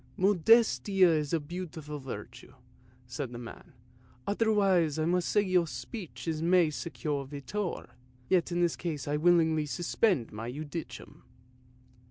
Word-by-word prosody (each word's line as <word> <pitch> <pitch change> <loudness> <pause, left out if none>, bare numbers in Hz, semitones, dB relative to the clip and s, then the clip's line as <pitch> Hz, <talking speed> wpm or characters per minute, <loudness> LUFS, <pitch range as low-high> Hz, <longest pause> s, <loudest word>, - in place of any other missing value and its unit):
" - - -29
Modestia 195 0 +4
is 150 -3 0
a 165 - +2
beautiful 155 -2 -7
virtue," 125 0 -9 0.5
said 125 +1 -5
the 120 - -7
man; 120 +2 -10 0.3
" - - -29 0.2
otherwise 200 -7 +2
I 155 - 0
must 175 +1 +1
say 205 - +3
to - - -5
your 180 -2 +3
speech 200 0 -7
mihi 165 +1 +2
secus 150 -3 -4
videtur, 170 +7 -4 0.4
yet 180 -2 +2
in 175 0 0
this 175 -2 +2
case 155 -6 -4
I 145 +1 0
willingly 160 -2 +3
suspend 175 - 0
my 115 +3 -5
judicium." 155 +4 -7
165 Hz, 145 wpm, -30 LUFS, 145-185 Hz, 0.5 s, Modestia